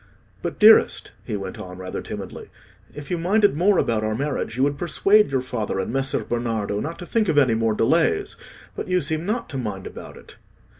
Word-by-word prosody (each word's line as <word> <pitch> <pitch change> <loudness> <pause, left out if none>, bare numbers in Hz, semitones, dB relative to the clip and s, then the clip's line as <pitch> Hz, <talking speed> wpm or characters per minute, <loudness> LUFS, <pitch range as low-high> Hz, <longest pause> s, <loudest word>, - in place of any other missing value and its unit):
"But, - - -4
dearest," - - +5
he 105 - -3
went 100 +3 -7
on, 90 -3 -8
rather 95 0 -5
timidly, - - -8 0.5
"if 145 +1 -8
you 175 - 0
minded 205 0 +3
more 185 +4 +3
about 110 -2 +1
our 110 0 -1
marriage, 135 -3 -3
you 130 - +2
would 145 +1 +1
persuade 195 +2 +3
your 135 -2 +1
father 115 -6 -3
and 95 +5 -3
Messer 135 0 -1
Bernardo 115 -4 -2
not 160 +7 -4
to 175 - -8
think 215 0 0
of 150 - +1
any 130 -5 +5
more 110 -1 +1
delays. 280 - +1 0.4
But - - -5
you 180 0 +2
seem 160 +2 -3
not 230 +3 -1
to 135 - -4
mind 105 -6 -5
about - - -9
it." - - -16
135 Hz, 205 wpm, -23 LUFS, 110-175 Hz, 0.5 s, dearest